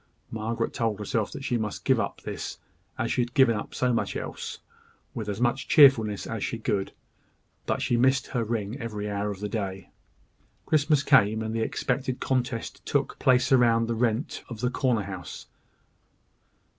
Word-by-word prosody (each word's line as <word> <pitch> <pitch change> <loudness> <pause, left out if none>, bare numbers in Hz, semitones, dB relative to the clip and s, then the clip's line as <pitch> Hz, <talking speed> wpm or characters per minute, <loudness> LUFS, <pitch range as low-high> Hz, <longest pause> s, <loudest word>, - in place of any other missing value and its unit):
Margaret 115 +1 -2
told 115 -3 -1
herself 105 +1 -2
that 135 - -7
she 120 -3 0
must 105 -1 -4
give - - +4
up - - -3
this, - - -5 0.4
as - - -1
she - - +1
had 120 +1 -4
given 130 -5 +5
up 105 - -6
so 125 -1 +1
much 115 - -1
else, - - -5 0.6
with 110 -2 -4
as 100 +1 -3
much 125 +3 0
cheerfulness 115 -8 +5
as 110 -2 -4
she 115 - -2
could; 105 -4 -1 0.8
but - - 0
she 120 - +1
missed 130 +2 +3
her 120 -3 -2
ring 110 +2 -3
every 105 -4 -4
hour 100 0 -2
of 100 -1 -6
the 105 - -2
day. 100 -3 -4 0.7
Christmas 150 -1 +3
came; 110 -2 +4
and 110 0 -3
the 115 - -1
expected 130 +3 -1
contest 125 -3 -2
took, - - -1
place 125 0 +3
about 115 -3 +4
the 115 - -1
rent 115 +2 -1
of 115 -3 -7
the 125 0 +1
corner 125 -5 +1
house. 95 -5 -7
115 Hz, 175 wpm, -27 LUFS, 105-125 Hz, 0.8 s, given